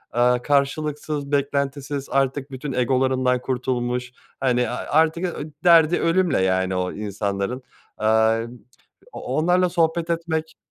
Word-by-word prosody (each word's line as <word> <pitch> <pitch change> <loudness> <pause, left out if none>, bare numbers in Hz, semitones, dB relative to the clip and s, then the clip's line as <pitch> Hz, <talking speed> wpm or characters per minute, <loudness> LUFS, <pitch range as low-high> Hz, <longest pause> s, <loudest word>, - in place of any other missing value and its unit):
eee, 125 0 +3
karşılıksız, 145 +1 -1
beklentisiz, 140 0 -1
artık 135 +1 0
bütün 135 +1 -5
egolarından 130 0 +1
kurtulmuş, 125 -1 -2 0.3
hani 125 -2 +1
a - - -4
artık, 160 +5 +1
eee, 155 -4 -4
derdi 170 -1 +5
ölümle, 170 - +2
yani, 95 0 +1
o 90 0 -2
insanların. 100 +3 -3 0.3
Aaa, 110 +1 +3 0.7
o - - -7
o 130 - -4
onlarla 180 +3 +3
sohbet 170 -1 0
etmek 160 -1 -2
135 Hz, 125 wpm, -22 LUFS, 125-155 Hz, 0.7 s, derdi